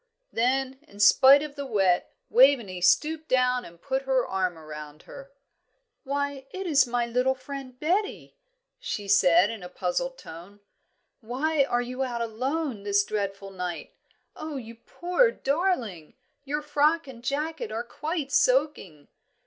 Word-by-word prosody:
Then, 260 +3 0
in 205 - -16
spite 265 +7 +7
of 300 -2 -7
the 285 -1 -6
wet, 195 -6 +1 0.2
Waveney 240 -8 +4
stooped 310 - +2
down 250 -1 +2
and 170 -4 -13
put 265 +9 -2
her 265 -2 +1
arm 185 -3 -2
round 150 -1 -10
her. 275 0 -12 0.7
"Why, 285 -1 -3
it 380 +6 -6
is 285 -6 +4
my 240 0 0
little 250 +3 +1
friend, 260 -1 -9
Betty," 380 +7 -1 0.4
she 345 - -5
said, 195 0 +5
in 225 -3 -7
a 180 - -8
puzzled - - -2
tone. 185 - -12 0.6
"Why 275 +5 0
are 245 -2 0
you 255 +2 -5
out 245 -2 -3
alone 255 +2 -2
this 200 0 +2
dreadful 195 -1 -4
night? 180 -4 -6 0.4
Oh, 310 -1 -6
you 230 -4 -7
poor 355 - +1
darling, 275 - -2 0.3
your 295 +2 -3
frock 300 +2 +2
and 240 -3 -11
jacket 290 -1 -3
are 225 +2 -3
quite 300 +3 -4
soaking. 255 - +1
255 Hz, 145 wpm, -26 LUFS, 205-290 Hz, 0.7 s, spite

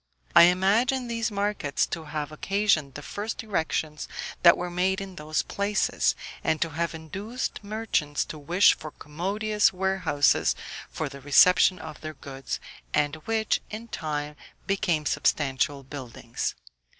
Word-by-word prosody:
I 170 - +10
imagine 220 +8 +2
these 230 -1 -1
markets 200 -8 0
to 165 -2 -5
have 150 0 -4
occasioned 180 -5 +1
the - - -7
first 215 +3 -4
erections 160 -6 -2 0.3
that 170 -1 +8
were 175 0 -4
made 185 +2 +1
in 195 -1 -7
those 155 0 -1
places, 200 +1 +1 0.3
and 160 - +1
to 165 - 0
have 170 +2 -2
induced 200 - -5
merchants 200 -9 -1
to 155 - -8
wish 175 +7 +5
for 155 - -8
commodious 200 +9 0
warehouses 185 -6 +2 0.3
for 160 - -3
the 140 0 -10
reception 180 +6 +6
of 155 -3 -9
their 155 0 -6
goods, 135 0 -6 0.4
and 150 +1 +1
which, 220 -1 +1
in 225 +2 -7
time, 150 -3 -3 0.3
became 180 -6 0
substantial 140 -1 +1
buildings. 130 -4 -5
170 Hz, 140 wpm, -26 LUFS, 150-200 Hz, 0.4 s, I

